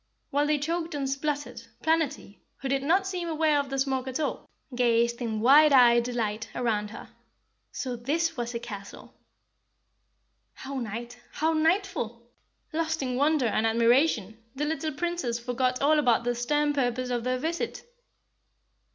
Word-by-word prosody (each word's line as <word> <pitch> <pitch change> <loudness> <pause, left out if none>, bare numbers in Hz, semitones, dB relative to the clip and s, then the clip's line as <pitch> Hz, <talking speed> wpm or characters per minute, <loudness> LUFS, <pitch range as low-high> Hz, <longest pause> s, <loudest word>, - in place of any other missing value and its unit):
While 290 +1 +2
they 300 0 +2
choked 330 +2 -2
and 275 -2 -2
spluttered, 285 -1 -3 0.2
Planetty, 315 - 0 0.2
who 270 - -5
did 270 0 0
not 360 +8 +2
seem 365 -3 -3
aware 310 -2 +2
of 280 -1 -3
the 270 - -3
smoke 265 -1 -1
at 260 +3 -3
all, 305 - -3 0.2
gazed 235 -1 +2
in 220 -3 -2
wide 290 +5 +7
eyed 240 -3 +6
delight 225 -3 -3
around 215 -4 -1
her. - - -10 0.6
So 255 -2 -4
THIS 325 +8 -1
was 240 -2 -4
a - - -1
castle! 200 -4 -9 1.4
"How 270 0 -6
nite, 235 +2 -6
how 320 +1 +1
netiful!" 320 - 0 0.5
Lost 320 -2 -1
in 250 -1 -2
wonder 290 0 +2
and 225 0 +1
admiration, 230 -2 +2 0.2
the 295 +2 -1
little 315 0 -2
Princess 325 -6 -2
forgot 250 +2 -1
all 305 +2 +4
about 240 -5 +3
the 245 0 0
stern 295 +5 0
purpose 255 -2 -1
of 240 -1 -1
their 255 +1 0
visit. 335 - -3
265 Hz, 155 wpm, -27 LUFS, 235-310 Hz, 1.4 s, wide